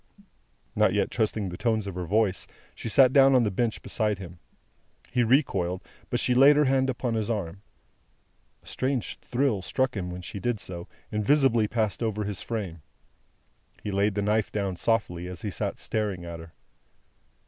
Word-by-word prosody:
Not - - +3
yet - - +1
trusting 110 -2 0
the 90 - -7
tones 110 -3 +1
of 100 - -5
her 90 0 -4
voice, 105 -1 +1 0.3
she - - -6
sat 130 +3 +6
down 135 -1 +6
on 125 - +5
the 105 - 0
bench 115 +3 -1
beside 105 -3 -1
him. 90 -2 -10 0.7
He 125 -1 +2
recoiled, 100 - +1 0.3
but - - 0
she 125 - +2
laid 135 +4 +7
her 150 0 +4
hand 130 0 +2
upon 125 -1 -2
his 110 -1 -1
arm. 100 -4 -3 1.0
A - - -21
strange 130 -2 -2
thrill 125 -5 0
struck 130 +6 -1
him 90 -3 -3
when 90 0 -7
she 100 - -6
did 115 +2 -1
so, 85 -3 -7 0.2
and 105 0 -1
visibly 130 -3 +4
passed 110 -2 -1
over 110 -2 -1
his 100 -2 -4
frame; 95 -8 -4 1.0
he 105 - -3
laid 100 +1 +1
the 100 - 0
knife 105 +1 +1
down 100 -3 -2
softly, 90 -5 -1
as 90 -2 -8
he 105 - -2
sat - - -3
staring 100 -5 -2
at 85 -1 -7
her. 80 0 -11
105 Hz, 180 wpm, -27 LUFS, 95-120 Hz, 1.0 s, laid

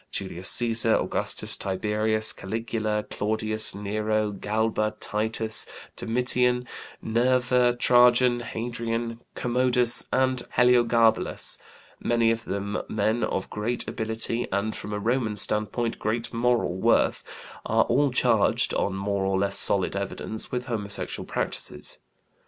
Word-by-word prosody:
Julius 95 -1 -3
Cæsar, 115 -1 +3
Augustus, - - -3
Tiberius, 110 +3 0
Caligula, 110 +1 -3
Claudius, 110 0 +4
Nero, 105 +1 -2
Galba, 110 +1 -2
Titus, 110 +1 -2 0.3
Domitian, 125 +1 0 0.4
Nerva, 125 +1 +2
Trajan, 120 0 +4
Hadrian, 115 0 -4 0.2
Commodus, 125 -1 +1
and 130 -1 +1 0.2
Heliogabalus 120 -2 +3 0.4
many 115 -1 +1
of 115 0 -3
them 100 +1 -3
men 110 +2 0
of - - -2
great 115 +3 -2
ability 115 +2 -1
and, 100 +3 -2
from 105 - -7
a 105 - -3
Roman 115 0 -1
standpoint, 110 +3 0
great 115 +2 -3
moral 115 -6 0
worth - - +1 0.4
are - - +2
all 140 +4 +1
charged, 120 -4 +1
on 100 - -1
more 100 0 -2
or 95 0 0
less 100 0 +2
solid 95 -1 +5
evidence, 100 +2 -4
with 125 0 -3
homosexual 105 -5 -3
practices. - - -4
115 Hz, 115 wpm, -25 LUFS, 105-120 Hz, 0.4 s, solid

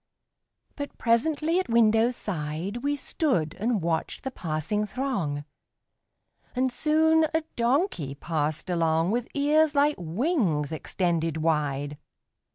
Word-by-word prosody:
But 285 -1 -6
presently 305 +8 +2
at 375 - -3
window 225 0 +4
side 180 -3 -3
We 285 +4 -1
stood 255 - 0
and 220 -3 0
watched 165 -1 -2
the 265 - -3
passing 165 - -2
throng, 195 - -2 1.1
And 255 +1 +1
soon 315 +4 +3
a 320 - +2
donkey 235 - 0
passed 155 +3 -2
along 165 +1 +2
With 240 +1 -1
ears 300 +2 +3
like 290 +1 +4
wings 175 - 0
extended 165 0 -1
wide. 145 -2 -1
215 Hz, 115 wpm, -27 LUFS, -, 1.1 s, window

